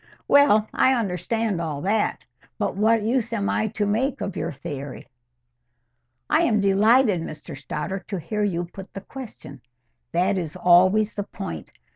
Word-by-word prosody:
"Well, 250 -7 +5
I 260 - +4
understand 215 -1 -1
all 155 -4 -3
that. 210 +3 0 0.3
But - - -1
what 220 +2 +3
use 235 +1 0
am 200 -3 0
I 220 - 0
to 210 0 -2
make 240 +7 0
of 195 - -4
your - - -3
theory?" 140 0 -7 1.2
"I 315 - +3
am 230 -10 +2
delighted, 205 +1 +4
Mr 155 -1 -8
Stoddart, 150 +7 -5
to 195 - -3
hear 210 +6 -3
you 175 -4 -1
put 190 +4 -12
the 195 - -5
question. 205 - -10 0.5
That 185 +3 +1
is 165 -2 -5
always 185 +4 +4
the 205 - -3
point. 80 - -7
200 Hz, 155 wpm, -24 LUFS, 175-220 Hz, 1.2 s, Well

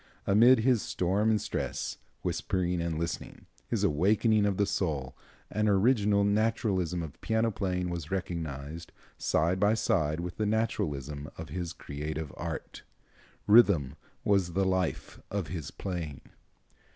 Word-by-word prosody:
Amid 115 +5 +6
his 120 -2 +3
storm 100 +5 +1
and 110 -1 +3
stress, - - -3 0.2
whispering 90 -2 -1
and 85 -2 -2
listening, 85 0 -4 0.2
his - - -1
awakening 105 +6 +3
of 100 -2 0
the 100 - +3
soul, 75 -10 -2 0.4
an 105 +1 +1
original 105 0 +3
naturalism 100 -5 +1
of 75 -4 -9
piano 110 0 +1
playing 90 -3 -2
was 85 -3 -5
recognized, 80 -4 -4 0.3
side 85 +4 +1
by 105 +2 +4
side 80 -7 +1
with 85 0 -5
the 105 - 0
naturalism 75 - -1
of 80 - -7
his 85 +2 -4
creative 75 -1 -5
art. - - -6 0.6
Rhythm 100 - +5 0.3
was 95 -4 +2
the 95 +2 +2
life 95 -3 -1
of 100 -6 -3
his 80 -4 -5
playing." 85 -8 -5
90 Hz, 135 wpm, -29 LUFS, 80-105 Hz, 0.6 s, Amid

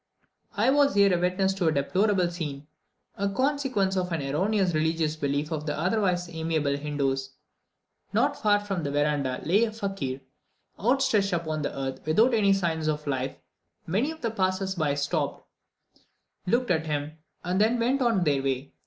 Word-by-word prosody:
I 230 +6 +4
was 280 -2 +3
here 200 -2 +5
a - - 0
witness 190 +2 0
of 170 - +3
a - - +4
deplorable 185 +6 +2
scene, 150 -5 -5 0.5
a 200 0 0
consequence 255 -4 0
of 180 -1 -1
an 165 -4 -1
erroneous 185 +6 +1
religious 160 0 0
belief 145 0 -2
of 155 -1 -3
the 150 - -2
otherwise 180 -2 0
amiable 160 -3 -1
Hindoos. 135 -2 -2 0.8
Not - - +2
far 205 -1 +4
from 195 -4 -3
the 145 - -2
verandah 145 -3 0
lay 200 +8 +3
a 220 - -4
fakir, 195 -12 -4 0.6
outstretched 230 -4 +2
upon 160 -3 -2
the 145 - -4
earth, 135 -1 -4
without 220 +11 +3
any 205 -3 +4
signs 165 -5 0
of 150 -1 -1
life; 135 -2 -2 0.5
many 210 - 0
of 320 0 -8
the 230 - -1
passers 190 -2 0
by 155 -6 0
stopped, 145 0 -2 1.0
looked 240 +3 +1
at 160 -2 0
him, 150 +1 -3 0.2
and 185 +3 0
then 225 +3 +3
went 255 +4 +1
on 230 -7 +2
their 145 -4 +2
way. 135 0 -2
175 Hz, 170 wpm, -27 LUFS, 150-205 Hz, 1.0 s, here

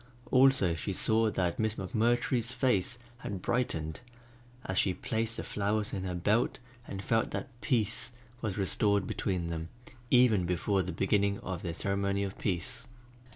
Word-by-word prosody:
Also 130 -9 +5
she 80 - -3
saw 110 0 +3
that 90 -4 -1
Miss 110 0 +1
McMurtry's 120 +4 +1
face 125 -3 +1 0.2
had 100 -5 -5
brightened, 80 -9 -1 0.7
as 95 - 0
she 95 -2 +2
placed 115 +3 -2
the - - -3
flowers 105 +1 -1
in 95 -2 -3
her 90 -1 -2
belt 105 +7 +1 0.3
and 95 0 -5
felt 115 +2 +1
that 135 - -4
peace 110 +1 +1 0.3
was 105 -4 -2
restored 100 0 +2
between 90 -4 -2
them 80 0 -4 0.4
even 115 -8 +5
before 95 +3 +1
the 90 +1 -3
beginning 100 +1 +1
of 90 -2 -4
their 85 -3 -4
ceremony 100 +1 0
of 95 0 -4
peace. 115 +7 -2
100 Hz, 155 wpm, -31 LUFS, 95-115 Hz, 0.7 s, Also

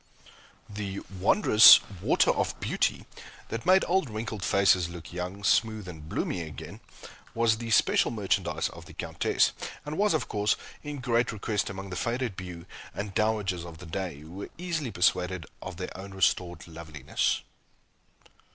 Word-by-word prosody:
The 100 -1 -5 0.2
wondrous 110 - +8 0.2
"Water - - +4
of - - -2
Beauty," - - 0 0.4
that 115 +7 -5
made 190 +1 +6
old 180 -6 +1
wrinkled 110 -2 -5
faces 95 -3 +3
look 85 0 -10
young, 90 +3 -5
smooth, 110 -1 +2
and 80 -3 -9
blooming 90 - -2
again, 80 -3 -8 0.6
was 115 -1 +2
the 115 -1 -5
special 110 - +4
merchandise 105 -4 0
of - - -12
the - - -13
Countess, - - +1 0.3
and 150 +3 -4
was, 205 -4 +3
of 155 - -1
course, 105 0 +1 0.3
in 145 -2 -6
great 120 -1 +1
request 105 -1 -2
among 95 -1 -7
the - - -4
faded 120 +2 -2
beaux 90 -2 -8 0.3
and 100 0 -4
dowagers 105 -5 0
of 85 -2 -9
the 90 - -11
day, 85 -3 -4
who 80 +1 -12
were 95 +3 -7
easily 165 -6 -3
persuaded 90 -2 +1 0.2
of - - -7
their - - -6
own 95 +1 -9
restored 90 -2 0
loveliness. 80 -4 -2
100 Hz, 155 wpm, -28 LUFS, 90-115 Hz, 0.6 s, wondrous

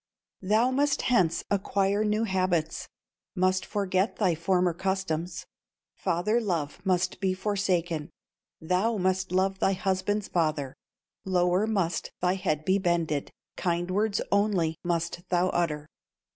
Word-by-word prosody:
"Thou 215 +6 +3
must 285 +2 +1
hence 180 -10 +2
acquire 200 +1 +1
new 215 +1 +1
habits, 185 -6 0 0.5
Must 185 0 +2
forget 195 0 0
thy 190 -5 +2
former 180 +1 +1
customs, 175 -2 -2 0.5
Father 210 +8 0
love 175 -5 -2
must 185 -1 0
be 190 -2 0
forsaken, 180 -5 -1 0.5
Thou 185 +7 +1
must 185 -1 0
love 190 +1 +1
thy 195 - +3
husband's 190 +2 -1
father, 155 -6 -1 0.5
Lower 180 +2 +2
must 190 -6 -1
thy 180 0 +2
head 155 -5 -1
be 190 +1 +3
bended, 170 -5 0 0.3
Kind 175 0 -1
words 205 +2 +1
only 200 -6 +2
must 170 0 -1
thou 180 0 +2
utter. 150 -4 -1
185 Hz, 125 wpm, -28 LUFS, 170-200 Hz, 0.5 s, Thou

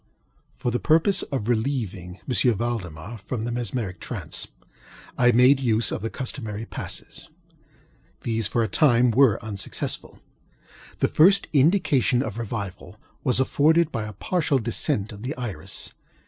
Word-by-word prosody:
For 120 - -2
the 120 - 0
purpose 165 +5 +3
of 130 -6 -4
relieving 110 -7 -2
M. 125 -2 +3
Valdemar 110 -3 -4
from 110 +3 -4
the 120 - -2
mesmeric 120 -5 -3
trance, - - -4 0.7
I 120 0 +4
made 125 +3 +5
use 115 -5 +1
of - - -3
the 115 - -2
customary 115 -5 -5
passes. - - -6 0.9
These, 115 -2 -1
for 115 +2 +1
a - - 0
time, 125 -4 +4
were 120 -2 +5
unsuccessful. 100 -3 -3 0.8
The - - +4
first 195 +6 +5
indication 145 - +3
of 110 +1 -5
revival 100 -4 -6 0.3
was 125 -3 +2
afforded 155 +5 +3
by 110 -2 -3
a 105 - -8
partial 150 - 0
descent 110 -3 -1
of 105 -1 -10
the 130 +4 -4
iris. 105 -11 -5
120 Hz, 140 wpm, -24 LUFS, 105-135 Hz, 0.9 s, made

